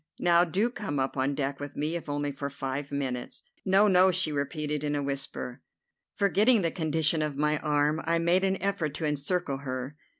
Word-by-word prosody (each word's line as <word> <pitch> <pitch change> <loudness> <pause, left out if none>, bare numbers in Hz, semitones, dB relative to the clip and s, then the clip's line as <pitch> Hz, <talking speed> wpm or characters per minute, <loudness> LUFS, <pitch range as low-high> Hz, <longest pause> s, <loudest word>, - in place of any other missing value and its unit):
Now, 175 0 +4
do 200 +8 0
come 190 -11 -4
up 135 0 -1
on 135 +1 0
deck 140 -1 -2
with 145 0 -7
me, 155 +3 -1
if 170 -3 -5
only 145 0 -1
for 140 +1 -5
five 140 +1 -4
minutes." 130 -3 -3 0.2
"No, 195 +2 +4
no," 185 -1 +6
she 185 -3 +1
repeated 150 +1 -2
in 145 0 -1
a 145 - -1
whisper. 135 -2 -4 0.5
Forgetting 205 +3 +4
the 165 - +1
condition 160 -1 +1
of 150 -2 -2
my 150 +1 +1
arm, 150 +1 +1
I 165 +1 +2
made 170 +3 +2
an 190 0 +1
effort 180 -7 -1
to 160 - -2
encircle 150 +1 -1
her. 130 0 -5
150 Hz, 195 wpm, -28 LUFS, 140-175 Hz, 0.5 s, no